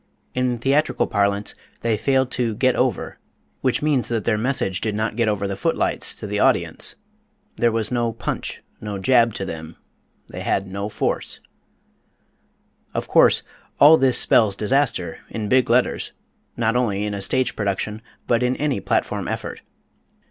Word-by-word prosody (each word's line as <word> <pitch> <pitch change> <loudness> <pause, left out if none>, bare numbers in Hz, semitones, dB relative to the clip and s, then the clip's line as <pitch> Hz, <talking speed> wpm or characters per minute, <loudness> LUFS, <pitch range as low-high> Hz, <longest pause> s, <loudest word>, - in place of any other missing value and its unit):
In 125 -1 0
theatrical 135 +6 +1
parlance, 100 0 0 0.3
they 115 -1 +1
failed 130 +3 +1
to 120 -3 0
"get 130 +2 +2
over," - - -1 0.4
which 130 +2 0
means 145 -5 +1
that 115 -3 -1
their 115 - +1
message 105 -5 -1
did 110 -2 -1
not 110 0 -1
get 115 -1 +1
over 100 -2 0
the 100 - -3
foot 165 +12 -1
lights - - -1
to - - -8
the - - -2
audience. - - +2 0.6
There 120 - +3
was 110 0 -1
no 120 -2 0
punch, 115 - -4 0.2
no 105 -2 -4
jab 115 +2 +3
to 95 - -3
them 80 -2 -7 0.5
they - - -8
had 95 - 0
no 100 +2 -4
force. - - -2 1.6
Of - - -2
course, - - +5 0.4
all 150 +3 +9
this 130 -5 +3
spells 105 -4 +5
disaster, 105 - 0
in 110 -2 -4
big 130 -2 +3
letters, 125 +2 +1 0.4
not 115 0 +1
only 105 -5 0
in 105 - -3
a 100 - -4
stage 130 +6 0
production 105 +1 -2 0.2
but 120 0 +2
in 125 +1 +1
any 145 -2 -1
platform - - -1
effort. - - -5
115 Hz, 165 wpm, -22 LUFS, 100-125 Hz, 1.6 s, all